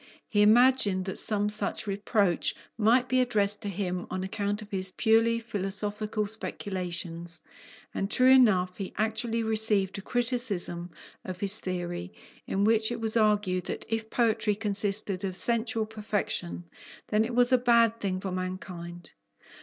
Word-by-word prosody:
He 205 - +1
imagined 215 -3 +4
that 190 - -1
some 205 -1 +1
such 210 0 -2
reproach 200 -2 0 0.2
might 235 +3 +3
be 255 0 +2
addressed 205 -4 +1
to 205 - -4
him 180 -2 -3
on 185 - -3
account 205 +1 -3
of 210 - -16
his 190 -1 +1
purely 225 +3 +2
philosophical 210 -1 -3
speculations, 175 -5 -3 0.5
and 195 - -2
true 255 +2 +4
enough 190 -9 +4
he 195 -2 -6
actually 225 +2 -1
received 215 -3 +2
a - - -8
criticism 230 -8 +1 0.3
of 185 -1 -7
his 200 0 +1
theory, 175 0 -4 0.4
in 195 - 0
which 220 +1 +3
it 240 - -4
was 225 0 0
argued, 210 -5 +1
that - - -4
if 225 0 -3
poetry 220 -3 +1
consisted 200 -2 -2
of 190 -2 -3
sensual 225 +1 -1
perfection, 210 -5 -3 0.5
then 210 0 +2
it 235 +1 -4
was 245 +1 +4
a - - +7
bad 235 -2 +3
thing 190 -3 -2
for 190 0 -5
mankind. 180 -2 -6
210 Hz, 150 wpm, -28 LUFS, 185-225 Hz, 0.5 s, a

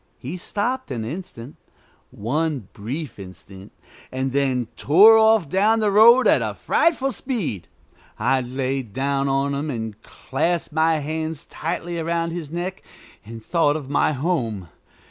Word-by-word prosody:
He - - -6
stopped 230 +8 -3
an 115 -5 -4
instant, 140 -3 -8 0.5
one 140 - -2
brief 125 +6 -6
instant, 95 +1 -12 0.4
and 130 +1 -2
then 130 -3 0
tore 200 +10 +7
off 220 -5 +4
down 210 +7 +2
the 210 -2 +1
road 235 +5 +7
at - - +4
a - - -3
frightful 275 -5 +1
speed. 205 - -3 0.5
I 130 +4 +1
lay 130 +2 -2
down 135 +4 -2
on 135 +1 0
him 145 +2 -3
and 110 -5 -5
clasped 165 +4 -3
my 160 +1 +2
hands 155 +1 -4
tightly 170 +1 -4
around 165 +1 -1
his 165 -4 -6
neck, 175 +3 -5 0.4
and 115 +1 -10
thought 160 -4 +2
of 145 -3 -6
my 145 - +2
home. 130 - -2
150 Hz, 145 wpm, -22 LUFS, 130-175 Hz, 0.5 s, tore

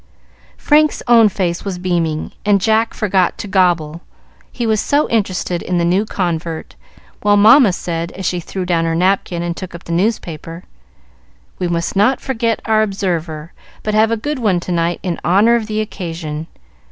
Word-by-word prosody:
Frank's 305 0 +2
own 230 -3 +6
face 180 -3 -2
was 195 -3 -4
beaming, 170 -4 -1
and 205 -1 +3
Jack 220 +3 +1
forgot 190 -5 +1
to - - -6
"gobble," 175 -4 +1 0.5
he 240 - -3
was 220 -2 +1
so 290 +1 +1
interested 185 -5 -1
in 180 - -2
the 170 - +1
new 185 +5 +2
convert, 170 -5 -3 0.5
while 205 0 +3
Mamma 220 +2 +7
said, 170 -1 -4
as 190 - -7
she 180 - 0
threw 185 +2 -5
down 170 -2 +1
her 165 0 0
napkin 180 -1 0
and 170 -1 -3
took 185 -1 -8
up 170 - -10
the - - -8
newspaper, 170 -3 -2 1.0
"We 180 - -1
must 170 +1 -2
not 240 +7 +3
forget 230 -4 -2
our 220 -1 +3
'Observer,' 170 -6 -3 0.3
but 215 - -2
have 215 +1 +4
a 230 - 0
good 290 +5 -3
one 205 -7 +1
tonight 175 -1 -1
in 180 -3 -3
honor 200 +7 +4
of 225 -2 -1
the 215 0 -1
occasion. 165 -6 -5
185 Hz, 175 wpm, -17 LUFS, 170-215 Hz, 1.0 s, Mamma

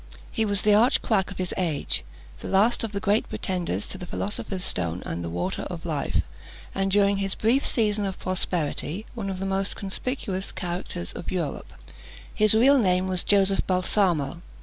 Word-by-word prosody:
He 225 -3 0
was 200 -1 +1
the 210 - +5
arch 230 +5 +4
quack 195 -4 +1
of 200 - -8
his 185 -1 -2
age, 165 -6 0 0.4
the - - -7
last 215 +6 +3
of 225 - -3
the 200 - -2
great 205 +2 +1
pretenders 175 - -2
to 190 - -2
the 180 - -7
philosopher's 195 -1 -3
stone 90 - -2
and 85 +1 -4
the 85 - -3
water 85 +1 -2
of - - -7
life, - - 0 0.5
and 195 0 0
during 200 0 +3
his 195 -1 -1
brief 240 +6 +2
season 210 -4 +2
of 195 -1 -3
prosperity, 180 0 -2
one 215 -5 -4
of 190 - -3
the 195 - -3
most 195 0 0
conspicuous 195 -1 -3
characters 175 - -4
of - - -6
Europe. 170 -6 -3 0.6
His 215 -1 +4
real 270 +5 +6
name 185 -3 +2
was 185 -1 +1
Joseph 195 -1 +4
Balsamo. 180 -4 +1
195 Hz, 180 wpm, -26 LUFS, 180-210 Hz, 0.6 s, real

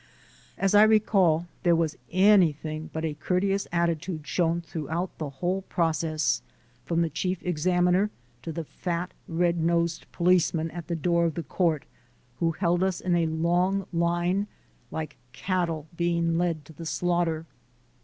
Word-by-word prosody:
As 195 0 +1
I 205 - +8
recall, 200 -6 +4 0.2
there 175 -1 +4
was 165 -2 0 0.2
anything 165 -5 +3
but 160 0 -3
a 155 - -1
courteous 190 +6 0
atti 170 -2 +1
tude 160 -5 -5
shown 170 0 +1
throughout 165 +2 -4
the 155 -3 -3
whole 180 +8 -2
process, 160 - 0 0.4
from 170 0 +1
the 165 - -1
Chief 180 +5 -1
Examiner 180 +3 +2 0.3
to 165 - -5
the 165 +1 -4
fat, 175 +3 -4 0.2
red 170 0 +1
nosed 170 0 0
policeman 170 -2 +2
at 170 -2 -7
the 170 - -1
door 170 +1 +2
of 165 -3 -1
the 170 - -3
Court, 160 0 0 0.5
who 165 -1 +1
held 175 +1 +1
us 190 -2 +1
in 180 -1 0
a 170 -1 +2
long 175 +4 +1
line 175 +4 +1 0.4
like 155 -2 -5 0.2
cattle 175 -4 -1
being 170 -1 +1
led 165 -3 0
to 160 - -13
the 165 +2 -7
slaughter. 170 -2 0
170 Hz, 155 wpm, -27 LUFS, 160-180 Hz, 0.5 s, I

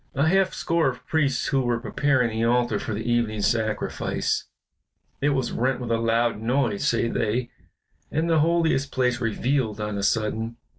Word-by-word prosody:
"A 140 +3 +2
half 190 +2 +3
score 165 -4 +1
of 125 - -8
priests 140 -4 0
who 135 - +2
were 120 -2 0
preparing 130 -1 +1
the 110 +1 -1
altar 120 -2 +2
for - - -5
the 110 +2 -4
evening 115 -3 0
sacrifice. 110 0 -1 0.8
It 145 - +3
was 130 -4 0
rent 130 +1 0
with 120 -2 -4
a 115 - +2
loud 115 -1 +1
noise, 120 -3 0
say 115 0 +2
they, 115 +2 -1 0.6
and 160 +2 -1
the 165 -2 +3
Holiest 160 -3 +2
place 125 -1 0
revealed 115 0 0
on 105 -1 -3
a - - -2
sudden. 115 +2 -1
120 Hz, 170 wpm, -24 LUFS, 115-135 Hz, 0.8 s, half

